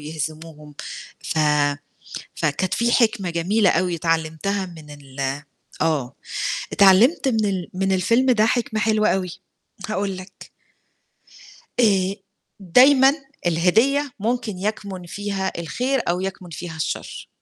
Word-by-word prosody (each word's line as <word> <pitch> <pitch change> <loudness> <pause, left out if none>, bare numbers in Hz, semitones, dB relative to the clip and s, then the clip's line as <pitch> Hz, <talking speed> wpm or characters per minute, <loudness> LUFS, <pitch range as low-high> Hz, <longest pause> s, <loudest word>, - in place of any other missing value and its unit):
يهزموهم. 155 0 -7 0.5
ف 160 - -3 1.0
فكانت 165 +4 -1
في 235 0 +1
حِكمة 215 -6 +2
جميلة 185 +4 +2
أوي 175 0 +1
اتعلِّمتها 165 +4 -1
من 160 -4 -12
ال 140 -2 -11 0.6
آه، 140 -6 0 0.6
اتعلِّمت 215 - +5
من 220 -3 +1
ال 185 -3 -2
من 195 +1 0
الفيلم 230 +8 +3
ده 215 -2 +3
حِكمة 225 -2 0
حلوة 215 -1 +2
أوي، 185 -2 0 0.6
هاقول 195 -2 -2
لك. 185 +1 -12 1.3
آآ 195 -4 +3 0.5
دايمًا 265 +8 +6 0.3
الهدية 225 - +2
ممكن 225 -3 -2
يَكْمُن 195 -3 -4
فيها 195 0 -3
الخير 250 - -1
أو 175 +1 0
يَكْمُن 190 -2 -5
فيها 165 0 -7
الشَر. 160 - -4
190 Hz, 115 wpm, -22 LUFS, 165-220 Hz, 1.3 s, دايمًا